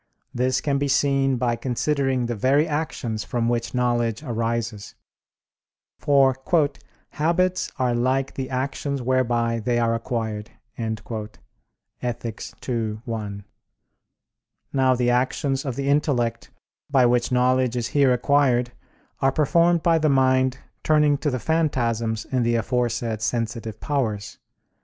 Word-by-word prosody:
This 130 +1 +1
can 140 -2 0
be 140 - 0
seen 135 -1 +2
by 120 -1 0
considering 130 +1 0
the 120 - -2
very 135 +8 +2
actions 140 -8 -3
from 115 +1 -1
which 120 +1 -1
knowledge 120 0 0
arises. 115 - -3 1.0
For 135 -2 +4 0.7
"habits 180 +4 0
are 125 -2 +1
like 130 +3 0
the 130 -1 -4
actions 140 +2 -2
whereby 120 -2 +1
they 120 +2 0
are 115 -1 +2
acquired" 115 -2 -3 0.3
(Ethic. 110 +1 -7 0.2
ii, 115 -4 -1
1). 105 -4 -5 1.3
Now 130 -1 +3
the 120 0 +1
actions 135 +2 0
of 130 -4 -3
the 140 +1 -3
intellect, 125 -5 0 0.4
by 135 -3 +4
which 120 +1 +2
knowledge 125 0 +2
is 120 -1 -2
here 140 -3 +3
acquired, 125 -1 +2 0.5
are 135 - +3
performed 170 +4 +3
by 165 -1 +4
the 155 -1 +2
mind 130 -1 +3 0.2
turning 150 -2 +3
to 150 - 0
the 130 - -1
phantasms 115 -7 0
in 130 -2 -1
the 120 0 +1
aforesaid 115 -2 -1
sensitive 115 -1 -3
powers. 110 -8 -2
125 Hz, 125 wpm, -23 LUFS, 115-135 Hz, 1.3 s, For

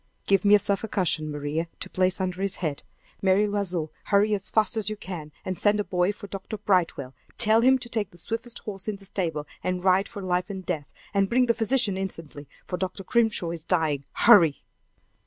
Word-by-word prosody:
"Give 195 -2 +3
me 205 0 +7
a - - +7
sofa 200 +2 -1
cushion, 160 -6 0
Maria, 145 +3 -3
to - - -4
place 185 0 0
under 185 0 -2
his 195 -1 -1
head. 155 -5 -3 0.4
Mary 195 +2 +3
L'Oiseau, 185 -6 -2
hurry 210 +1 +3
as 200 -1 -2
fast 220 +2 +2
as 220 -1 0
you 215 - -4
can, 170 -7 -7
and 185 -1 -3
send 210 0 +3
a - - +1
boy 180 0 +1
for 205 - -10
Dr. 195 +2 -6
Brightwell; 180 -10 0 0.2
tell 220 -1 +6
him 260 +2 +5
to 250 - -7
take 220 -4 -2
the 175 - -18
swiftest 230 +6 -5
horse 195 -2 -6
in 215 - -1
the 195 0 -14
stable, 165 -6 -3 0.2
and 180 -1 -2
ride 190 +1 +3
for 200 - -8
life 180 +1 -1
and 190 -2 -6
death, 155 -6 -3 0.3
and 195 -1 +2
bring 250 +1 +3
the 235 - +3
physician 225 -3 +1
instantly, 165 -6 -6 0.2
for 180 - -4
Dr. 185 +2 -4
Grimshaw 225 -7 +1
is 165 -2 -5
dying! 155 -6 0
Hurry!" 185 -11 +5
190 Hz, 210 wpm, -26 LUFS, 175-210 Hz, 0.4 s, me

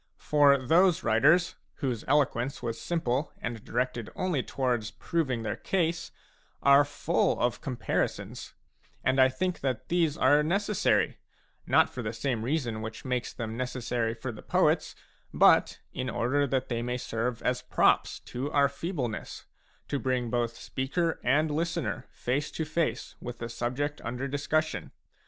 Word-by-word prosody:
For 145 -2 +4
those 170 +7 +3
writers, 150 +11 +4 0.2
whose 125 -7 -2
eloquence 135 -3 +1
was 115 -1 -3
simple 150 -4 -1
and 115 -2 -5
directed 120 -2 -2
only 180 -7 0
towards 120 -5 -1
proving 130 0 -2
their 105 0 -2
case, 170 +5 -1 0.5
are 140 +1 +7
full 145 0 0
of 120 0 0
compari 125 -4 0
sons; - - -9 0.5
and 130 +1 +3
I 130 - +6
think 180 +8 -2
that 130 -4 -3
these 165 -3 +2
are 145 +3 +5
necessary, 200 +6 +1 0.5
not - - +5
for 125 - -7
the 110 -1 -3
same 120 -1 -1
reason 120 -4 -1
which 110 +3 -7
makes 125 -1 -1
them 110 -2 -5
necessary 120 -2 -2
for 120 +2 -5
the 110 - -10
poets, - - +1 0.4
but - - +5 0.2
in 130 0 -3
order 140 +5 +1
that 130 0 0
they 115 -2 -2
may 125 +1 -2
serve 115 0 -3
as 125 0 0
props - - +2
to 135 +4 -5
our 140 -2 +4
feebleness, 140 - -4 0.4
to 140 - -1
bring 125 -3 -1
both 120 -1 -1
speaker 160 +6 -2
and 150 +5 +2
listener 165 +2 -2
face 135 +4 -2
to 160 - -2
face 155 -6 -1
with 120 0 -6
the 115 -1 -5
subject 130 +6 -2
under 125 +3 -3
discussion. 150 +3 -1
130 Hz, 150 wpm, -29 LUFS, 120-150 Hz, 0.5 s, are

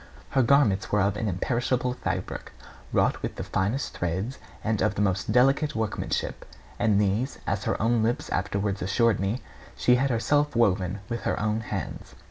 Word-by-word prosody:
Her 135 - +3
garments 120 -6 +3
were 105 - +3
of 100 +1 +1
an 110 +1 -2
imperishable 125 +6 0
fabric, 125 - -4 0.4
wrought - - +2
with - - -4
the - - -4
finest 105 +9 -1
threads 95 +10 -2 0.2
and 110 -1 0
of 100 - +1
the 105 - -1
most 100 +1 0
delicate 135 +5 +3
workmanship; 110 -1 -2 0.4
and 105 -3 +3
these, 105 +7 0
as 100 0 -1
her - - 0
own 115 +1 +2
lips 115 +2 0
afterwards 100 +1 -1
assured 115 +4 +2
me, 100 +6 -1 0.3
she 125 0 +4
had 135 +2 +1
herself 145 +4 +1
woven 100 -4 +2
with 120 -1 -3
her - - -1
own 105 +1 0
hands. 115 - -5
110 Hz, 170 wpm, -26 LUFS, 100-125 Hz, 0.4 s, she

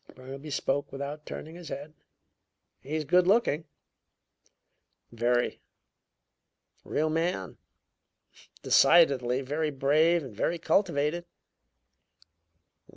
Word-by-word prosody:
Burnaby 135 +3 -9
spoke 145 0 -1
without 140 +2 -6
turning 160 - -7
his 170 -2 -10
head. 145 +2 -7 0.9
"He's 155 +2 -4
good 180 +5 +3
looking." 190 -7 +2 1.5
"Very." 120 +1 0 1.2
"A - - -17
real 155 +1 0
man." 160 - -2 1.0
"Decidedly! 135 -5 +4
Very 150 +4 -2
brave 150 +4 +2
and 125 -6 -10
very 170 +10 -1
cultivated." 170 -1 0
150 Hz, 90 wpm, -28 LUFS, 135-165 Hz, 1.5 s, Decidedly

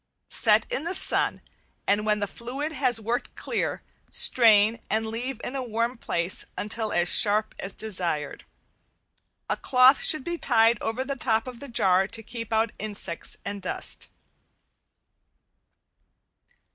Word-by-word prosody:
Set - - +3
in - - -1
the 350 +3 +1
sun, - - +3 0.4
and 210 +2 +1
when 210 0 +2
the 205 - 0
fluid 260 +9 -5
has 255 -6 +1
worked 230 +3 -3
clear, - - -3 0.3
strain 230 - +4
and 220 +1 0
leave 235 +3 -3
in 255 - -5
a 270 - -2
warm 235 0 -2
place 175 -5 -3
until 215 +1 -2
as 175 0 +1
sharp 215 +3 +2
as 195 - -5
desired. 175 -9 -3 1.0
A - - 0
cloth 255 +1 +5
should 310 -4 +4
be 345 +2 -4
tied 230 -2 +3
over 225 +4 -2
the 275 0 -3
top 225 -4 0
of 250 -2 -9
the 280 - -9
jar 190 -4 +2
to 225 +1 -6
keep 230 0 -7
out 220 0 +1
insects 200 -5 -3
and 200 0 -5
dust. 185 - -3
225 Hz, 145 wpm, -26 LUFS, 210-255 Hz, 1.0 s, cloth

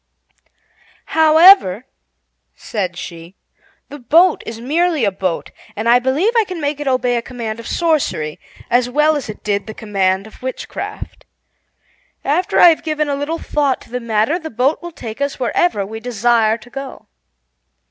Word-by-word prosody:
"However," 315 - +6 0.7
said 185 -5 -4
she, 170 +1 -9 0.5
"the 290 - -9
boat 330 +8 +4
is 225 0 -6
merely 310 +2 +1
a 200 - +1
boat, 185 -3 -3 0.2
and 220 +2 -3
I 240 +1 +6
believe 285 - +1
I 455 - +5
can 370 -4 -7
make 290 -1 -2
it 295 - -5
obey 250 -2 +1
a - - -1
command 230 -2 -6
of 230 - -8
sorcery, 300 - -1 0.3
as 245 0 +2
well 300 +4 +3
as 275 -6 -4
it 215 - -9
did 205 0 -1
the 220 - -7
command 195 -3 0
of 220 - -15
witchcraft. 260 0 -7 1.0
After 325 +7 +1
I 350 - +9
have 325 - +1
given 305 -2 -2
a 285 - 0
little 290 +4 -3
thought 285 -5 -1
to - - -17
the 250 - -2
matter, 230 +7 0
the 315 -2 -7
boat 255 +5 0
will 345 0 -7
take 230 -4 -8
us 280 -1 -2
wherever 245 - 0
we 220 +3 -7
desire 230 -1 +1
to 235 +1 -16
go." 275 0 -8
250 Hz, 170 wpm, -18 LUFS, 220-310 Hz, 1.0 s, I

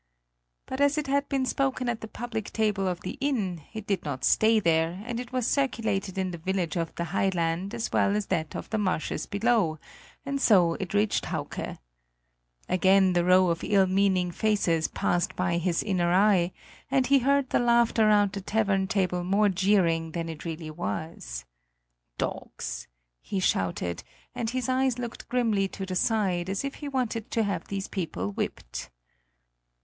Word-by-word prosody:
But 260 +2 -4
as 285 +1 +3
it 300 - 0
had 280 +1 0
been 270 -1 +1
spoken 260 -1 0
at 235 -2 -2
the 220 - -6
public 220 -2 -5
table 210 -3 0
of 180 -1 -2
an - - -3
inn, 210 - -1
it 220 -2 -7
did 195 -2 -1
not 135 -3 -4
stay 220 0 +4
there, 165 +1 +1
and 240 -1 -3
it 245 0 -7
was 255 -2 -1
circulated 220 -9 0
in 190 -1 -1
the 170 - -7
village 180 -1 -1
of 165 -2 -2
the 170 - -2
high 195 +3 +1
land 175 +3 -1
as 230 -1 -3
well 200 - +2
as 210 -1 -1
that 160 -5 -2
of - - -5
the 220 - 0
marshes 185 -5 -1
below; 205 -6 +1 0.5
and 275 0 -2
so 180 -9 +5
it 190 +1 -4
reached 205 +1 +2
Hauke. - - -4 0.9
Again 190 0 +4
the 175 -1 +2
row 185 0 +5
of 170 - -3
ill 195 -2 +4
meaning 185 -1 +2
faces 175 -6 +1
passed 175 0 -1
by 180 -2 0
his 170 -1 0
inner 180 -4 +1
eye, 185 -2 +4 0.4
and 265 -1 +2
he 275 +1 +5
heard 275 +1 +2
the - - +3
laughter 235 -2 +3
round 205 -2 +4
the 200 - -5
tavern 195 -1 +1
table 180 -3 0
more 200 +3 +3
jeering 175 -4 +2
than 165 -1 -3
it 160 0 -8
really 160 -1 -5
was. 155 - -5 0.7
"Dogs!" - - -4 0.3
he 195 - -3
shouted, 90 - 0 0.3
and 240 -3 -2
his 255 0 -2
eyes 260 -1 +1
looked 240 -1 -6
grimly 225 -6 +1
to 195 0 -6
the 185 -1 -4
side, 190 -5 +1
as 195 +7 -2
if 275 - -3
he 290 - -4
wanted 245 -5 -2
to 225 - +1
have 195 -5 -2
these 195 -1 -3
people 140 - -3
whipped. - - -5
195 Hz, 180 wpm, -27 LUFS, 175-230 Hz, 0.9 s, so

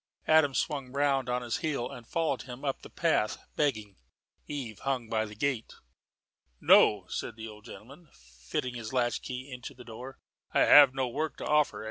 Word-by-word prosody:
Adam 155 -4 +4
swung 140 -5 -2
round 135 -2 +1
on 125 0 -1
his 120 -2 -2
heel 155 -8 -2
and 120 -2 -10
followed 160 -5 -1
him 125 +2 -9
up 135 - -2
the - - -11
path, 160 -10 +1 0.2
begging. 110 -9 -1 0.5
Eve 125 -8 -6
hung 130 -4 -2
by 110 0 0
the 105 -1 -10
gate. 130 -1 -2 0.8
"No," 100 -3 +5
said - - -5
the 110 0 -7
old 105 0 -12
gentleman, 140 +8 -13
fitting 65 - -6
his 115 -1 -7
latchkey 125 +2 -2
into 125 +2 -8
the 125 0 -13
door, 125 +4 -9 0.4
"I - - +5
have 140 -3 +8
no 130 -1 0
work 155 +6 -3
to - - -6
offer. 150 -1 +2
125 Hz, 175 wpm, -29 LUFS, 115-140 Hz, 0.8 s, have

